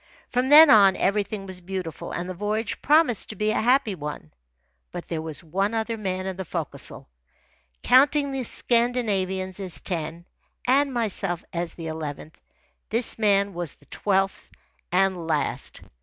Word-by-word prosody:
From 250 +1 +1
then 300 +1 +9
on, 200 -3 +7
everything 200 0 -1
was 185 -1 -7
beautiful, 180 -3 -6
and 175 +1 -4
the 185 - -4
voyage 210 +4 -3
promised 295 - +3
to 215 - -6
be 215 0 0
a - - 0
happy 245 -1 +3
one. 150 - -7 0.6
But - - -7
there 160 -2 -3
was 160 0 -3
one 195 +7 -1
other 225 +1 -1
man 185 -3 -3
in 190 -1 -4
the 190 - -3
forecastle. 170 - -6 0.8
Counting 280 +2 +4
the 270 -1 -2
Scandinavians 205 -7 0
as 185 -3 -4
ten, 170 -1 -4 0.4
and 275 +2 +3
myself 200 -7 -1
as 170 0 -3
the 165 - -8
eleventh, 155 -1 -6 0.5
this 230 0 0
man 200 -2 +2
was 175 -3 -4
the - - -21
twelfth 195 -1 -1 0.4
and 185 -2 +1
last. 160 - -2
195 Hz, 155 wpm, -25 LUFS, 175-230 Hz, 0.8 s, then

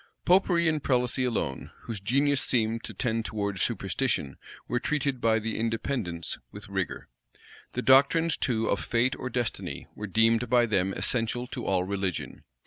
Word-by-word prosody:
Popery 175 -2 +4
and 155 -2 +1
prelacy 125 -1 +1
alone, 105 - -2
whose 115 -3 -5
genius 135 +7 +2
seemed 115 -2 0
to - - -7
tend 115 -3 -1
towards 100 -4 -3
superstition, 70 - -1 0.3
were 120 - 0
treated 140 -2 -1
by 110 -1 +3
the 110 0 -3
Independents 110 - -2
with - - -9
rigor. - - -3 0.7
The 125 - -2
doctrines 145 +5 +5
too 115 -3 0
of 100 - 0
fate 120 +2 +1
or 130 - -5
destiny 120 -2 -3
were 105 - -6
deemed 115 +4 +3
by 120 -1 +5
them 95 -4 +1
essential 120 0 0
to 125 -1 -6
all 95 -2 +2
religion. 95 -2 -3
115 Hz, 155 wpm, -28 LUFS, 105-130 Hz, 0.7 s, doctrines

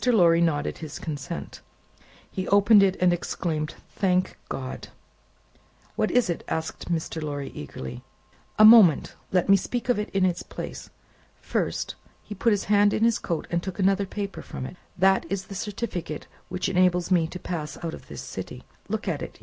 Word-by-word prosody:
Lorry 175 -9 +5
nodded 155 -4 0
his 155 -3 -7
consent. 155 +2 -6 0.7
He 185 -1 -3
opened 205 +1 +6
it, 195 -1 +3
and 180 -1 +4
exclaimed, 160 -3 -2 0.2
"Thank 185 -1 +1
God!" 130 -1 -5 1.1
"What - - +1
is 245 -4 +3
it?" 170 - -3
asked 160 +2 -4
Mr. 160 -1 -2
Lorry, 145 -2 -4
eagerly. 65 -3 -7 0.6
"A 215 - +8
moment! 215 -8 +7 0.2
Let 180 -1 +2
me 195 - +7
speak 245 +6 -2
of 245 - +3
it 210 - -3
in 195 -1 +2
its 175 -2 0
place. - - -7 0.5
First," - - -2 0.3
he 210 - -7
put 210 +4 +1
his 205 -2 +1
hand 205 0 +4
in 220 - 0
his 230 -1 +3
coat, 170 -3 -3
and 170 0 +1
took 190 0 -6
another 195 0 +2
paper 200 0 -5
from 130 - -7
it, 155 - -8 0.2
"that 190 +1 +3
is 195 -1 -2
the 195 - -9
certificate 195 -5 -4 0.2
which 185 +1 -2
enables 180 -1 +2
me 170 -3 +4
to 180 - -7
pass 160 -4 -5
out 165 -1 -3
of - - -10
this - - -7
city. - - -7 0.3
Look - - -3
at - - -1
it. - - -7
185 Hz, 180 wpm, -26 LUFS, 165-200 Hz, 1.1 s, A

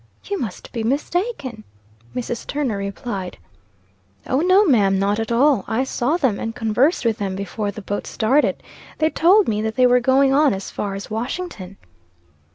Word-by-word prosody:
"You 400 -1 -3
must 215 -7 -6
be 230 - -3
mistaken," 280 - -2 0.5
Mrs. 240 -1 -4
Turner 275 -8 -1
replied. 200 -1 -5 0.9
"O 260 - 0
no, 370 +4 +5
ma'am, 205 - +3
not 200 +2 +1
at 225 +1 -3
all. 255 -2 +3
I 230 +3 0
saw 265 +4 0
them, 260 - 0
and 225 +1 -4
conversed 250 +6 +1
with 225 -1 +1
them 195 -2 -2
before 200 +2 -3
the 205 +1 -7
boat 205 +1 -4
started. 260 +7 +1 0.3
They 315 0 +1
told 385 +5 +4
me 210 -1 0
that 220 0 -2
they 255 - +4
were 250 0 +5
going 265 +2 +3
on 285 -5 +4
as 195 - -7
far 200 -1 -3
as 200 +2 -8
Washington." 220 - -5
235 Hz, 170 wpm, -21 LUFS, 205-280 Hz, 0.9 s, no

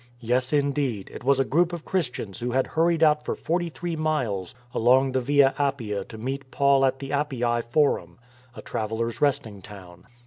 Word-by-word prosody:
Yes, 125 +2 0
indeed, 140 -7 0
it - - -9
was 135 +1 +3
a 135 - +3
group 170 +6 +2
of 170 -2 -6
Christians 125 - -3
who 120 - -2
had 130 0 +2
hurried 165 0 +1
out 150 -1 +4
for - - -2
forty 175 +1 -1
three 170 +1 -5
miles 130 - -2 0.2
along 130 +3 +4
the 130 0 0
Via 140 +1 +4
Appia 120 -8 -1
to 110 - -10
meet 130 +4 -5
Paul 140 0 +3
at 135 0 +1
the 135 0 -7
Appii 125 -5 0
Forum 120 - +1 0.2
— 125 -1 -29
a - - -9
travellers' 110 +2 -3
resting 115 -8 0
town. 90 -3 -13
130 Hz, 185 wpm, -25 LUFS, 115-145 Hz, 0.2 s, out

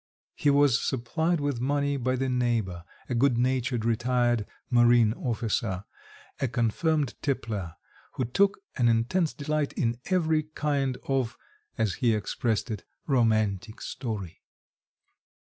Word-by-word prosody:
He 145 - +1
was 140 -2 +4
supplied 160 +7 0
with 145 -4 -1
money 140 +2 +1
by 130 -1 0
the 135 +1 -1
neighbour, 115 -9 0 0.2
a - - -2
good 125 0 +3
natured 125 -1 0
retired 120 -1 +1 0.2
marine 120 -2 +5
officer, 110 -5 -2 0.6
a 135 - +1
confirmed 130 +5 0
tippler, 105 - -2 0.4
who 130 - -1
took 195 - +2 0.2
an 120 - +3
intense 120 +9 +2
delight 150 0 -2
in 115 -1 -1
every 160 -4 +2
kind 145 -4 -1
of 130 -4 0 0.4
as 105 -3 +1
he 115 -3 +4
expressed 110 +2 -1
it 105 - -4 0.2
romantic 110 - +1
story. 110 - -5
125 Hz, 125 wpm, -27 LUFS, 115-140 Hz, 0.6 s, marine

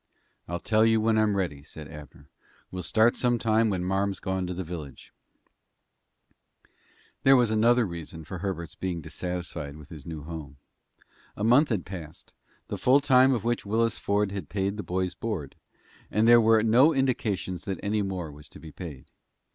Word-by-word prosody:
"I'll 85 +1 -3
tell 110 +4 +2
you 110 0 +4
when 110 0 +2
I'm 105 -2 +2
ready," 85 -7 -2
said 75 +1 -11
Abner. 75 -1 -12 0.4
"We'll 90 - -4
start 110 +7 +3
some 120 -1 +1
time 110 0 +2
when 95 -3 -1
marm's 95 +1 -1
gone 95 -1 -2
to 90 - -3
the 95 - -3
village." 80 -5 -9 2.1
There 135 0 +6
was 120 -4 +3
another 115 +2 +4
reason 85 -2 -7
for 90 +3 -7
Herbert's 85 -4 -4
being 90 -3 -4
dissatisfied 80 -2 -5
with 75 -2 -13
his 75 -4 -11
new 80 -3 -6
home. 75 -3 -8 0.8
A 105 - -4
month 125 +7 +5
had 105 -7 -1
passed 85 -4 -9 0.3
the - - -5
full 130 +3 +5
time 130 -2 +5
for 110 - -8
which 120 0 0
Willis 115 +2 0
Ford 100 0 0
had 100 -1 -6
paid 100 0 -1
the 105 - -4
boy's 90 -1 -2
board 100 -12 -5 0.5
and 110 +2 +2
there 120 0 +8
were 110 -1 +4
no 130 +8 +5
indications 105 -9 -1
that 95 -3 -3
any 105 +1 0
more 95 -5 -4
was 75 +1 -13
to - - -13
be 80 - -11
paid. 75 -6 -9
95 Hz, 180 wpm, -27 LUFS, 85-110 Hz, 2.1 s, there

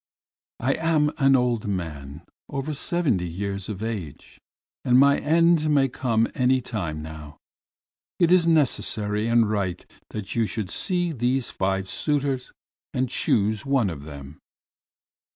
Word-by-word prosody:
"I 130 +3 +1
am 155 -2 +2
an 135 -1 +5
old 120 -4 0
man, 80 -6 -5 0.3
over 140 +2 -3
seventy 140 - 0
years 100 +3 -4
of 105 0 -5
age, 100 -11 -6 0.4
and 125 0 +4
my 140 +1 +5
end 165 0 +3
may 140 -2 +3
come 115 -3 0
any 130 +1 +2
time 85 -11 -4
now. 75 -1 -10 0.8
It 170 -1 +3
is 180 -2 +5
necessary 110 -9 +2
and 115 -1 +3
right 100 -4 -2 0.2
that 105 -3 -6
you 115 -2 +1
should 100 -4 -4
see 175 -2 0
these 125 -2 -1
five 95 0 -1
suitors 140 0 -1 0.4
and 130 0 0
choose 105 -1 +1
one 135 -8 +1
of 75 -4 -8
them." 70 -1 -10
115 Hz, 135 wpm, -24 LUFS, 95-140 Hz, 0.8 s, an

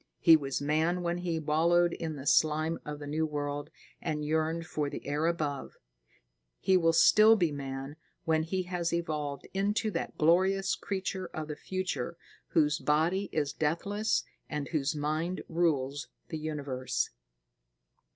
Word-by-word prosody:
He 165 - +7
was 140 -2 -1
man 160 +5 +1
when 175 0 -1
he 175 -2 -1
wallowed 165 +3 +3
in 160 -2 -4
the 135 -1 -8
slime 155 +2 +3
of 150 0 -5
the 145 - -8
new 155 +2 -1
world 145 -1 -3 0.3
and 150 -2 -2
yearned 160 +2 0
for 150 -2 -2
the - - -7
air 150 +3 0
above. 150 -5 -2 0.8
He 190 - +3
will 165 -2 +4
still 215 +6 +7
be 175 -7 +1
man 135 +1 -5 0.3
when 160 -1 +3
he 185 +4 -1
has 175 -2 -2
evolved 150 -4 -3
into 205 +3 0
that 165 - -4
glorious 190 +4 +3
creature 190 -1 -3
of 155 -1 -4
the 150 - -3
future 185 -2 -3 0.3
whose 150 -1 +2
body 170 +6 +1
is 145 -3 -1
deathless 200 +8 0 0.3
and 150 -2 -3
whose 150 -1 0
mind 155 +5 -2
rules 145 -5 0 0.2
the 160 - -4
universe. 140 -5 -2
160 Hz, 150 wpm, -30 LUFS, 150-175 Hz, 0.8 s, He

